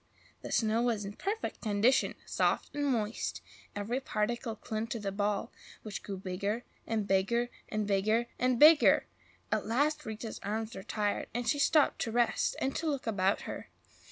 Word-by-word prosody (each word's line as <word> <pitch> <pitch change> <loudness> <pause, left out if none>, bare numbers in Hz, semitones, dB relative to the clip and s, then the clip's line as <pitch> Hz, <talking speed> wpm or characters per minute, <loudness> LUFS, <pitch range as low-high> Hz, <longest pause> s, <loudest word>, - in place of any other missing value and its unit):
The - - -7
snow 225 0 +2
was 230 -4 0
in 200 - -5
perfect 415 - -3
condition, 220 +4 +2
soft - - 0
and 290 0 0
moist; 225 -4 -1 0.4
every 215 +5 -1
particle 230 -1 -2
clung 220 +1 -4
to 230 +1 -3
the 200 -2 -3
ball, 205 0 -1 0.3
which 215 -2 -5
grew 195 -2 -5
bigger 200 +5 -2 0.2
and 220 -2 0
bigger 235 +6 +2 0.2
and 215 -1 -1
BIGGER 210 +4 +2
and 250 -1 +2
BIGGER! 305 +1 +7 0.5
At - - 0
last 290 +7 +1
Rita's 220 +1 -5
arms 220 +2 -3
were 190 - -6
tired, 205 +1 -1
and 245 0 -2
she 290 - +2
stopped 300 +1 +4
to 225 - -1
rest 240 +1 +2
and 270 - -1
to 330 - -2
look 280 -4 -1
about 195 -3 +1
her. - - -7
225 Hz, 170 wpm, -31 LUFS, 205-245 Hz, 0.5 s, BIGGER